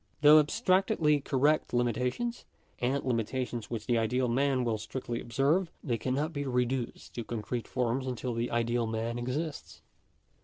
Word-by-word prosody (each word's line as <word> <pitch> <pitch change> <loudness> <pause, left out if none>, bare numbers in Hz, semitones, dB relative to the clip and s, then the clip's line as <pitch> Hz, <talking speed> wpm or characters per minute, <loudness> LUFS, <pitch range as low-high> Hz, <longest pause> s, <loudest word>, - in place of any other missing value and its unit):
Though 150 +1 +9
abstractedly 185 -2 +2
correct 140 0 +1
limitations, 125 - -1 0.4
and 130 +3 0
limitations 120 -1 -2
which 115 -3 -4
the 120 -2 +2
ideal 125 +3 +1
man 130 +1 +2
will 115 -3 0
strictly 120 +1 -4
observe, 140 +10 +1
they 120 -5 -1
cannot 140 +7 -1
be 145 -1 -2
reduced 125 -1 -2
to 120 - -4
concrete 115 +1 -4
forms 125 +1 -1
until 125 0 -3
the 115 +1 -1
ideal 120 0 0
man 115 +2 -2
exists. 145 +6 -4
125 Hz, 145 wpm, -30 LUFS, 120-140 Hz, 0.4 s, Though